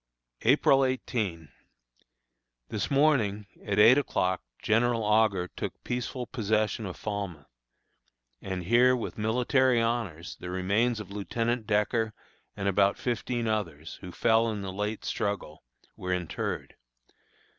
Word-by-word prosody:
April 135 Hz, +2 st, +4 dB
18. 105 Hz, -, -2 dB, 1.2 s
This -, -, -2 dB
morning, 135 Hz, -8 st, +2 dB, 0.2 s
at 100 Hz, -1 st, -2 dB
eight 115 Hz, +6 st, +8 dB
o'clock, 95 Hz, -9 st, 0 dB, 0.2 s
General 115 Hz, +1 st, +2 dB
Augur 105 Hz, -4 st, +3 dB
took -, -, -6 dB
peaceful 125 Hz, +1 st, -3 dB
possession 110 Hz, -2 st, -1 dB
of 90 Hz, -, -7 dB
Falmouth; 100 Hz, -8 st, -4 dB, 1.0 s
and 95 Hz, -2 st, -4 dB
here, 120 Hz, +6 st, +5 dB
with 115 Hz, -2 st, -5 dB
military 125 Hz, +3 st, +2 dB
honors, 115 Hz, -8 st, -2 dB
the 90 Hz, -, -6 dB
remains 100 Hz, +6 st, +1 dB
of 100 Hz, -2 st, -8 dB
Lieutenant 115 Hz, +3 st, -2 dB
Decker 110 Hz, +1 st, +1 dB, 0.4 s
and 100 Hz, -1 st, -2 dB
about 100 Hz, 0 st, +3 dB
fifteen 120 Hz, 0 st, -2 dB
others, 85 Hz, -8 st, -3 dB
who 90 Hz, -, -8 dB
fell 115 Hz, +4 st, +3 dB
in 105 Hz, -2 st, -4 dB
the 95 Hz, -1 st, -5 dB
late 105 Hz, +2 st, -3 dB
struggle, 100 Hz, -7 st, -3 dB, 0.3 s
were 90 Hz, -, -4 dB
interred. 90 Hz, -3 st, -3 dB
110 Hz, 125 wpm, -28 LUFS, 100-120 Hz, 1.2 s, eight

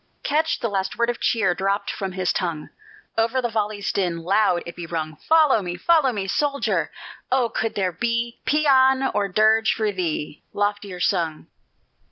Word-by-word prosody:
Catch 310 Hz, +2 st, 0 dB
the 235 Hz, -, 0 dB
last 195 Hz, -2 st, -2 dB
word 235 Hz, 0 st, +2 dB
of 240 Hz, -, -9 dB
cheer 200 Hz, -6 st, +2 dB
Dropt 195 Hz, +2 st, -1 dB
from 190 Hz, -2 st, -5 dB
his 185 Hz, -1 st, 0 dB
tongue; 170 Hz, -4 st, -3 dB, 0.5 s
Over 230 Hz, +3 st, +1 dB
the 240 Hz, -2 st, -1 dB
volley's 210 Hz, -2 st, -1 dB
din, 180 Hz, -4 st, -1 dB
Loud 185 Hz, -1 st, +2 dB
be 175 Hz, -, -6 dB
it 165 Hz, -, -14 dB
rung, 155 Hz, -2 st, -3 dB
"Follow 310 Hz, -, +4 dB
me! 175 Hz, -1 st, -5 dB
follow 305 Hz, -, +3 dB
me!" 200 Hz, -4 st, -3 dB
Soldier, 280 Hz, +8 st, 0 dB, 0.4 s
oh! 255 Hz, -3 st, +2 dB
could 225 Hz, 0 st, -2 dB
there 190 Hz, -2 st, 0 dB
be 235 Hz, +5 st, -2 dB
Pæan 265 Hz, -3 st, +4 dB
or 200 Hz, -, +1 dB
dirge 220 Hz, +3 st, +3 dB
for 215 Hz, -1 st, 0 dB
thee 165 Hz, -5 st, -3 dB
Loftier 205 Hz, -2 st, -2 dB
sung! 170 Hz, -5 st, 0 dB
205 Hz, 170 wpm, -23 LUFS, 180-240 Hz, 0.5 s, Follow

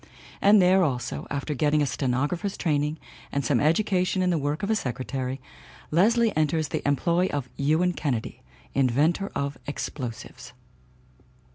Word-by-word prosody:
And 205 Hz, +1 st, +6 dB
there, 185 Hz, +1 st, +5 dB
also, 125 Hz, -6 st, -2 dB
after 140 Hz, +2 st, -3 dB
getting 150 Hz, +2 st, +2 dB
a -, -, +2 dB
stenographer's 145 Hz, -, -1 dB
training 150 Hz, -2 st, 0 dB, 0.3 s
and 140 Hz, -2 st, -1 dB
some 125 Hz, -3 st, +2 dB
education 185 Hz, +3 st, +2 dB
in 180 Hz, -, +2 dB
the 170 Hz, -, +1 dB
work 145 Hz, +5 st, -2 dB
of 200 Hz, -, 0 dB
a -, -, +3 dB
secretary, 130 Hz, -, -3 dB, 0.5 s
Leslie 225 Hz, +7 st, +3 dB
enters 155 Hz, 0 st, +1 dB
the -, -, -2 dB
employ 170 Hz, +6 st, +2 dB
of 145 Hz, -7 st, -3 dB
Ewan 160 Hz, +6 st, +2 dB
Kennedy, 130 Hz, -9 st, -3 dB, 0.3 s
inventor 145 Hz, +9 st, +1 dB
of 140 Hz, -2 st, -3 dB
explosives. 125 Hz, -2 st, -6 dB
150 Hz, 140 wpm, -26 LUFS, 135-180 Hz, 0.5 s, And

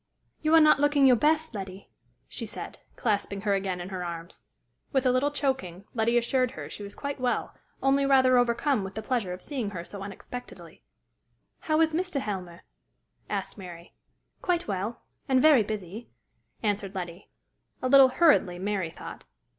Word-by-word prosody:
"You 315 Hz, +1 st, +4 dB
are -, -, +9 dB
not 305 Hz, -2 st, +6 dB
looking 290 Hz, -1 st, +4 dB
your 255 Hz, -2 st, +7 dB
best, 315 Hz, +3 st, +2 dB
Letty," 195 Hz, -1 st, -7 dB, 0.4 s
she -, -, -6 dB
said, -, -, -8 dB, 0.2 s
clasping 200 Hz, -3 st, -1 dB
her 205 Hz, -1 st, +1 dB
again 190 Hz, -2 st, -1 dB
in 175 Hz, +1 st, -6 dB
her 185 Hz, -2 st, -4 dB
arms. 170 Hz, 0 st, -7 dB, 0.4 s
With 265 Hz, -2 st, +1 dB
a 255 Hz, -, +5 dB
little 255 Hz, +3 st, +2 dB
choking, 265 Hz, -, -2 dB
Letty 235 Hz, +1 st, +2 dB
assured 250 Hz, +2 st, +2 dB
her -, -, -8 dB
she -, -, -8 dB
was 200 Hz, 0 st, -7 dB
quite 280 Hz, -1 st, -5 dB
well, 250 Hz, -1 st, -1 dB, 0.3 s
only 275 Hz, +1 st, +3 dB
rather 260 Hz, -2 st, +5 dB
overcome 240 Hz, 0 st, +1 dB
with 190 Hz, 0 st, -7 dB
the 220 Hz, -, -4 dB
pleasure 230 Hz, -6 st, -1 dB
of 180 Hz, +1 st, -6 dB
seeing 255 Hz, -8 st, -3 dB
her 180 Hz, -4 st, -6 dB
so 200 Hz, +2 st, -8 dB
unexpectedly. 225 Hz, +5 st, -9 dB, 0.8 s
"How 310 Hz, 0 st, 0 dB
is 320 Hz, -1 st, +3 dB
Mr. 360 Hz, -3 st, -1 dB
Helmer?" 185 Hz, -7 st, -5 dB, 0.7 s
asked -, -, -3 dB
Mary. 175 Hz, -2 st, -10 dB, 0.5 s
"Quite 350 Hz, -2 st, 0 dB
well 205 Hz, +3 st, -3 dB, 0.3 s
and 260 Hz, -1 st, +4 dB
very 295 Hz, -3 st, +6 dB
busy," 210 Hz, +1 st, -5 dB, 0.5 s
answered 205 Hz, -2 st, -1 dB
Letty 175 Hz, 0 st, -6 dB, 0.5 s
a 255 Hz, -, -1 dB
little 270 Hz, 0 st, +8 dB
hurriedly, 260 Hz, -, +3 dB
Mary 190 Hz, -2 st, -2 dB
thought. -, -, -10 dB
230 Hz, 170 wpm, -27 LUFS, 195-275 Hz, 0.8 s, are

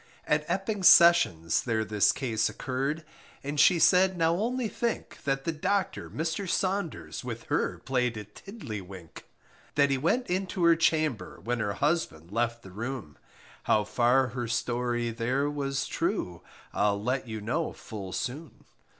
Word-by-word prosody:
At 150 Hz, -1 st, +1 dB
Epping 195 Hz, +1 st, -2 dB
Sessions, 165 Hz, -, +6 dB
there 110 Hz, -2 st, 0 dB
this 105 Hz, -2 st, +3 dB
case 115 Hz, -5 st, -1 dB
occurred. 140 Hz, +5 st, -3 dB, 0.4 s
And 145 Hz, +1 st, -3 dB
she 170 Hz, +4 st, +6 dB
said, 185 Hz, +2 st, +4 dB
now 165 Hz, 0 st, +3 dB
only 235 Hz, +6 st, -1 dB
think, 235 Hz, +1 st, -4 dB
That 135 Hz, -1 st, 0 dB
the 165 Hz, -, -1 dB
docter, 185 Hz, +4 st, -1 dB
Mr. 160 Hz, +4 st, -3 dB
Saunders, 190 Hz, -3 st, -2 dB
With -, -, -6 dB
her -, -, 0 dB
played 125 Hz, -3 st, -1 dB
at 105 Hz, 0 st, -9 dB
tiddly 145 Hz, -, -7 dB
wink; 90 Hz, -3 st, -12 dB, 0.5 s
That 140 Hz, -1 st, +4 dB
he 135 Hz, -, +1 dB
went 240 Hz, -, +1 dB
into 185 Hz, -1 st, -2 dB
her 170 Hz, 0 st, +6 dB
chamber, 155 Hz, -6 st, 0 dB
When 120 Hz, +1 st, -1 dB
her 105 Hz, -3 st, -1 dB
husband 120 Hz, -, -1 dB
left 115 Hz, +1 st, -1 dB
the 95 Hz, -, -11 dB
room, 115 Hz, -, -6 dB, 0.5 s
How 105 Hz, -, +3 dB
far 125 Hz, +4 st, +2 dB
her 120 Hz, -1 st, -4 dB
story 120 Hz, 0 st, -1 dB
there 125 Hz, +5 st, 0 dB
was 135 Hz, -2 st, -2 dB
true, 165 Hz, -, -2 dB, 0.3 s
I'll 100 Hz, 0 st, +1 dB
let 125 Hz, +4 st, -2 dB
you 110 Hz, -1 st, -5 dB
know 130 Hz, +10 st, -2 dB
full 100 Hz, -4 st, -8 dB
soon. 135 Hz, -, -5 dB
135 Hz, 155 wpm, -28 LUFS, 115-165 Hz, 0.5 s, Sessions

